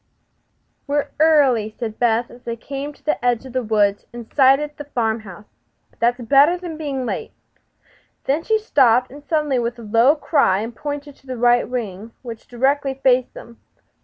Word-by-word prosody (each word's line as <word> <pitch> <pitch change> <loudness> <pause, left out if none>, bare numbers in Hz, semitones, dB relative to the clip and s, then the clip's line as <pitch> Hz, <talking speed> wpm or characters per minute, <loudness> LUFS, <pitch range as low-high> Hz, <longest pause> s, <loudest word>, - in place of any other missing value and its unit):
"We're 290 0 -1
early," 280 -9 +4
said 220 -2 -5
Beth, 235 0 +1
as 240 - -15
they 235 -1 -5
came 275 +5 -6
to - - -23
the 300 -5 -1
edge 245 0 +1
of 260 - -10
the 255 - 0
woods 210 -3 +1
and 235 -1 -9
sighted 280 +2 +3
the 290 - -7
farm 230 -5 -1
house; 205 -1 -12 0.5
"but - - -31
that 240 +2 +1
is 240 - -7
better 285 +8 +5
than 350 -3 -7
being 280 -5 -4
late." - - -4 0.9
Then 285 +4 0
she 440 +6 +1
stopped 255 - +2 0.2
suddenly 300 -5 +1
with 235 0 -3
a 235 - -10
low 230 +7 +4
cry 280 - +2
and 230 +1 -6
pointed 290 +1 -6
to 270 - -25
the 255 -1 -5
right 240 +1 +3
wing, 225 -3 -5
which 230 -3 -9
directly 270 +2 0
faced 255 -2 +1
them. 235 0 -12
250 Hz, 185 wpm, -20 LUFS, 230-285 Hz, 0.9 s, better